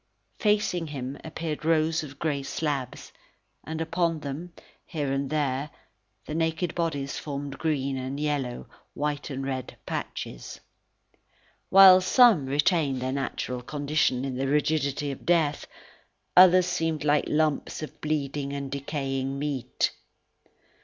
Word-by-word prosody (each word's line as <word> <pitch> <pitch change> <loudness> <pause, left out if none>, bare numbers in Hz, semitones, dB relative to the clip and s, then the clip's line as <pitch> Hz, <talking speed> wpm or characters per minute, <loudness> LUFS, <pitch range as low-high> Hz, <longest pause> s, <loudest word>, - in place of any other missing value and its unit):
Facing 210 -5 +1
him 135 -2 -5
appeared 160 -1 -5
rows 160 0 +2
of 145 -3 -9
grey 150 -3 -1
slabs, 135 -3 -3 0.5
and 160 0 -5
upon 165 -1 0
them, 150 +5 -6 0.3
here 145 -5 -3
and 135 0 -1
there, 145 -1 -1 0.6
the - - -6
naked 160 +1 0
bodies 145 -5 -2
formed 140 -2 -5
green 140 -4 -1
and 130 +2 -4
yellow, 145 -5 -2 0.3
white 145 0 -2
and 135 -1 -4
red 130 -2 -4
patches. - - -5 1.1
While 190 -1 +9
some 205 - +5
retained 145 -1 +2
their 130 +1 -2
natural 130 -2 -3
condition 145 -1 0
in 130 -2 -3
the 135 +1 -1
rigidity 145 0 0
of 135 - -8
death, 160 -4 +1 0.7
others 185 0 +8
seemed 165 -3 -1
like 150 0 +3
lumps 155 0 0
of 155 - -9
bleeding 145 -2 -2
and 140 -1 -4
decaying 135 -1 -3
meat. 140 -3 -1
145 Hz, 125 wpm, -27 LUFS, 135-160 Hz, 1.1 s, While